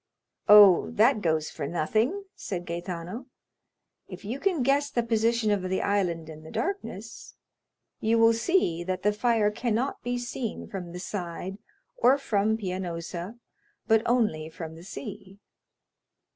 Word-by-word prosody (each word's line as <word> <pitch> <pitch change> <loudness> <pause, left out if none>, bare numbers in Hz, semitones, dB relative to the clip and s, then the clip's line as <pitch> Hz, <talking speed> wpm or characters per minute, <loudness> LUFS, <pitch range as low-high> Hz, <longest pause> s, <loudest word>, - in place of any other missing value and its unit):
"Oh, 200 - +8
that 80 - +3
goes 160 -3 0
for 145 -3 -4
nothing," 220 - 0
said 175 -3 -5
Gaetano. 175 +7 -5 0.8
"If - - -10
you 240 +7 -4
can 350 -5 +1
guess 280 +2 +2
the 240 - 0
position 230 -1 +1
of 205 -2 +1
the 185 +1 -1
island 180 -5 0
in 155 -1 -10
the 155 - -11
darkness, 395 +2 -5 0.6
you 225 +1 +2
will 230 0 +6
see 230 - +1
that 185 +1 -3
the 210 +1 +3
fire 215 -1 +2
cannot 235 +4 -1
be 245 0 -2
seen 240 -1 -4
from 180 -3 -6
the 180 - -7
side 180 +1 -5 0.4
or 255 +3 +4
from 220 -4 +1
Pianosa, 180 0 -5 0.5
but 220 0 +4
only 215 -11 +1
from 160 0 -8
the 165 +1 -12
sea." 200 -1 -8
205 Hz, 145 wpm, -27 LUFS, 175-235 Hz, 0.8 s, Oh